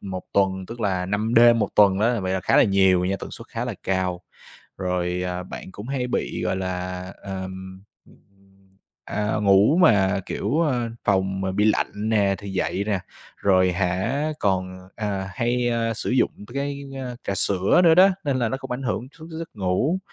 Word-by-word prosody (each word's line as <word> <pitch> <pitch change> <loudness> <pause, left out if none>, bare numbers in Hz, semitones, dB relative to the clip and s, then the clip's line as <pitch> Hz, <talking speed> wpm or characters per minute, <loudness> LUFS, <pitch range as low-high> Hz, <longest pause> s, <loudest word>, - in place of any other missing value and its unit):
một 95 -2 -6
tuần, 95 -1 +1
tức 115 0 -9
là 95 -3 0
5 105 +4 -1
đêm 120 0 +7
1 110 - +1
tuần 100 -2 +5
á, 115 +1 +2
vậy 95 0 -2
là 95 - 0
khá - - +2
là - - +7
nhiều 95 -2 +3
nha, 95 +1 0
tần - - -7
suất - - -10
khá - - -4
là - - -4
cao, 95 -1 -1 0.6
rồi, 90 -1 -1
à, 90 0 -3
bạn 95 - -9
cũng 105 +5 -9
hay 130 -2 -1
bị, - - -2
gọi - - 0
là, 90 -1 -4 0.2
ờm 95 -1 -7 1.2
à, 105 +1 -2
ngủ 100 +9 +5
mà, 100 - +4
kiểu, 145 +12 0
à, 125 -6 0
phòng 95 -1 +1
mà 95 0 -2
bị 105 +2 +1
lạnh 105 0 0
nè, 100 -3 +2
thì 100 - -8
dậy 95 +1 -1
nè, 100 -3 0 0.4
rồi 95 -2 +3
hả 95 - -1
còn, 95 -2 -1
à, 100 -3 -3
hay, 120 +3 0
a, 115 -1 0
sử 110 - -4
dụng 125 -1 +3 0.2
cái 140 0 -3 0.4
trà 100 - -2
sữa 95 - +2
nữa 165 -1 +7
đó, 185 +3 +7 0.2
nên 140 -3 0
là 120 -3 +1
nó 135 - -2
cũng 135 0 -9
ảnh 125 +2 -3
hưởng 125 0 -2
trước 160 - -10
giấc 165 0 -6
ngủ, 105 - 0
100 Hz, 190 wpm, -23 LUFS, 95-120 Hz, 1.2 s, đêm